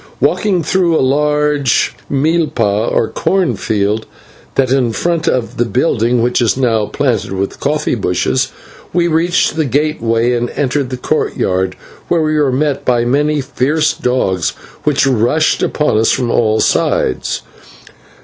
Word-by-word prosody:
Walking 190 -6 +1
through 170 0 +2
a - - +2
large 150 -2 +1 0.2
/milpa/, 140 -8 +1
or 115 - +1
corn 185 - 0
field 105 +2 -1 0.5
that 130 -2 +1
in 125 -4 +1
front 165 - -1
of 125 -3 -1
the 120 - +1
building 120 -2 +1
which 125 +1 +1
is 120 +1 +1
now 115 -5 +1
planted 120 -9 -1
with 95 +1 -3
coffee 150 +2 -1
bushes 90 - 0 0.4
we 175 -1 +2
reached 170 0 +1
the 160 - +1
gateway 125 -5 0
and 120 0 -1
entered 140 -1 -1
the 130 - -4
courtyard, 95 -6 -1 0.3
where 170 -2 +1
we 155 0 0
were 150 -3 +2
met 140 +1 -1
by 120 -2 +1
many 145 +4 +1
fierce 150 +4 0
dogs 95 -9 -1 0.3
which 145 -2 +2
rushed 130 +5 +1
upon 150 -8 +1
us 110 - +2
from 125 -3 0
all 110 -2 +2
sides. - - 0
130 Hz, 145 wpm, -15 LUFS, 115-150 Hz, 0.5 s, through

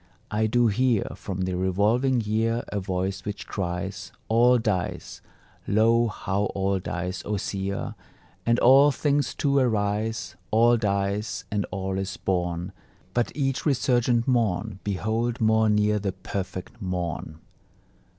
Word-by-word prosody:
I 110 +1 +1
do 120 +2 +3
hear 115 0 +2
From 95 -2 -5
the 95 0 -1
revolving 105 +8 +2
year 115 +2 0
A 105 - -2
voice 95 +1 -2
which 105 0 -5
cries: 95 0 -4 0.2
"All 120 +2 +5
dies; 105 -6 -2 0.5
Lo, 115 +3 +4
how 100 -1 -1
all 95 0 +1
dies! 90 +1 -4
O 105 0 -2
seer, 100 0 -3 0.5
And 115 +3 +2
all 135 +4 +7
things 145 0 0
too 140 -1 +2
arise: 110 -3 0
All 115 +2 +5
dies, 100 -1 -1
and 100 -2 0
all 95 0 -3
is 95 0 -4
born; 90 -1 -2 0.4
But 120 -1 0
each 135 -3 -1
resurgent 120 -4 +2
morn, 110 -5 0
behold, 110 +4 -1
more 110 -1 +3
near 105 0 +2
the 100 -2 -2
Perfect 95 +2 -6
Morn." 90 -4 -3
105 Hz, 130 wpm, -25 LUFS, 95-115 Hz, 0.5 s, all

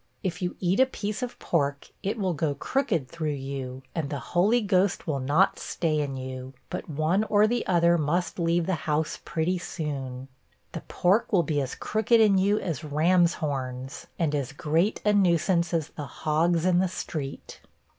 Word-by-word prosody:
If 175 -2 -3
you 180 0 -2
eat 185 +3 +1
a 260 - +6
piece 210 -3 -4
of 250 -1 -4
pork, 140 -4 -1
it 210 +3 -2
will 190 -4 0
go 150 -2 -1
crooked 165 - -1
through 155 -1 -3
you, 135 -1 -6
and 160 -4 -2
the 145 - -3 0.2
Holy 205 +8 +4
Ghost 200 -3 +1
will 145 -4 -1
not 145 +9 +2
stay 155 -3 -1
in 140 -2 -2
you, 130 0 -7 0.2
but - - -5
one 155 +7 +1
or 210 -1 +4
the 240 +2 0
other 170 -1 +4
must 170 +5 -1
leave 170 0 +2
the 190 - 0 0.2
house 150 +1 0
pretty 175 +3 -1
soon. 135 -7 -5 0.4
The - - -6
pork 195 +6 +2
will 185 -5 +4
be 145 -1 0
as 130 - -4
crooked 220 +2 +2
in 205 -3 +5
you 200 +2 +3
as 170 -6 -3
ram's 170 +4 +3
horns, 135 -3 -4
and 160 -4 0
as 140 -1 -2
great 160 +8 0
a 210 - +4
nuisance 175 -2 +2
as 165 -3 -1
the 145 -2 -7
hogs 165 +4 +1
in 180 -1 +4
the 190 - +2
street. 150 -6 -6
170 Hz, 185 wpm, -27 LUFS, 145-185 Hz, 0.4 s, a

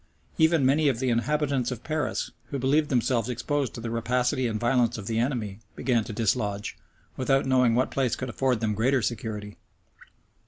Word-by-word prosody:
Even 160 -3 +4
many 145 +3 +4
of 130 - 0
the 130 +1 0
inhabitants 140 +1 0
of 125 -3 -6
Paris, 155 -4 -2
who 140 - -4
believed 145 +4 +2
themselves 120 -2 +1
exposed 130 +3 -2
to 115 - -6
the 115 0 -4
rapacity 125 +3 0
and 110 -2 -2
violence 120 -1 +2
of 105 - -7
the 115 +2 -1
enemy, 115 -6 -2 0.2
began 120 -4 +1
to - - -6
dislodge, 105 -1 -1 0.4
without 135 +1 +2
knowing 125 -3 +3
what 130 +2 +1
place 125 -3 0
could 130 - -5
afford 125 -1 0
them 110 -1 0
greater 125 +4 +2
security. 105 -3 -4
125 Hz, 175 wpm, -26 LUFS, 115-135 Hz, 0.4 s, Even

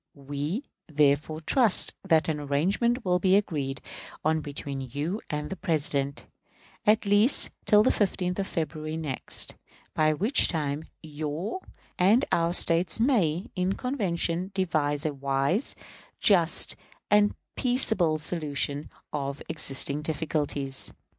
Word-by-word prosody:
We, 145 - -4 0.2
therefore, 150 +1 +1
trust 225 - +4
that 165 -5 +2
an 155 -2 -1
arrangement 195 - 0
will 180 -1 +2
be 190 +1 +3
agreed 145 -9 -1 0.4
on 160 0 +2
between 140 -2 -6
you 145 - -4
and 150 +1 -4
the - - -3
President, 140 -5 -2 0.6
at 215 +1 +4
least 205 +6 +3
till 210 0 +5
the 255 - +3
15th 185 -2 -1
of 195 - -1
February 155 -1 -4
next; 150 -5 0 0.4
by 155 0 +2
which 215 - +3
time 150 -2 -2 0.2
your 155 - -4 0.4
and 210 +9 +4
our 170 0 +2
States 175 +2 +2
may, 195 - +1
in 185 +1 0
convention, 185 -8 -2
devise 155 -5 0
a 155 - 0
wise, 140 - 0 0.4
just, 180 -7 +4 0.4
and 210 0 +4 0.2
peaceable 220 - +3
solution 150 -2 -2 0.2
of 140 -1 -4
existing 140 -1 +3
difficulties. 145 -3 -2
160 Hz, 120 wpm, -27 LUFS, 145-195 Hz, 0.6 s, till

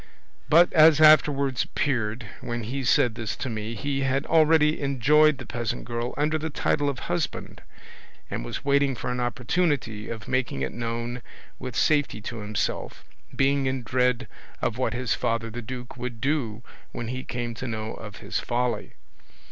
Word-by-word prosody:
But, 170 +3 +6
as 155 -1 +7
afterwards 140 -4 +5
appeared, 115 -4 -1 0.2
when 120 -1 -4
he 130 +5 -3
said 115 +1 +3
this 110 -2 -4
to 130 - -4
me 110 +1 -4
he 135 +4 -2
had 135 +1 0
already 155 -1 +4
enjoyed 145 +2 +4
the 130 - -8
peasant 120 0 -3
girl 120 +1 -3
under 155 +2 +1
the 160 +1 -3
title 145 -1 0
of 140 - -3
husband, - - -3 0.7
and - - -4
was - - -6
waiting 140 -1 +3
for 125 - -3
an 125 - -2
opportunity 120 -3 -1
of 110 -1 -6
making 130 - -1
it 65 - -2
known 120 +1 -3 0.4
with 125 -2 -6
safety 145 -7 +2
to 115 +3 -6
himself, 105 0 -3 0.3
being 135 0 +2
in 130 -1 -2
dread 125 0 +1 0.3
of 115 - -1
what 115 -2 0
his 125 -1 0
father 115 0 -1
the 120 +2 -5
duke 125 +1 -7
would 120 -2 -5
do 120 -5 -1 0.3
when 120 - -5
he 130 +1 -4
came 120 -1 -4
to 130 +3 -6
know 110 -1 -4
of 105 -3 -9
his - - -1
folly. 120 -2 -2
125 Hz, 170 wpm, -26 LUFS, 115-140 Hz, 0.7 s, as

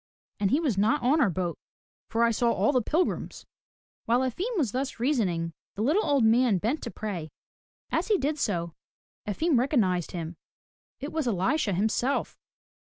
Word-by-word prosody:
And 200 - +2
he 280 - +3
was 265 - 0
not 215 +4 +2
on 290 +6 +3
our 200 - +4
boat 175 -1 -3 0.5
for 230 +1 +1
I 235 - +4
saw 235 +1 +2
all 285 - +2
the 255 -3 +2
pilgrims.'* 325 +10 -1 0.6
While 240 +2 +3
Efim 365 - -2
was 265 - +1
thus 260 0 -3
reasoning, 190 - 0 0.2
the 210 - -2
little 325 - +2
old 280 -4 +2
man 225 -1 +4
bent 230 - -1
to 235 - -5
pray. 190 -9 -5 0.6
As - - 0
he 425 -3 +3
did 295 0 -1
so, 170 -8 -1 0.5
Efim 280 - +2
recognized 200 - +1
him. 170 -1 -6 0.6
It 285 +3 -5
was 315 -5 -1
Elisha 205 - +1
himself. 220 +8 0
235 Hz, 165 wpm, -27 LUFS, 195-285 Hz, 0.6 s, our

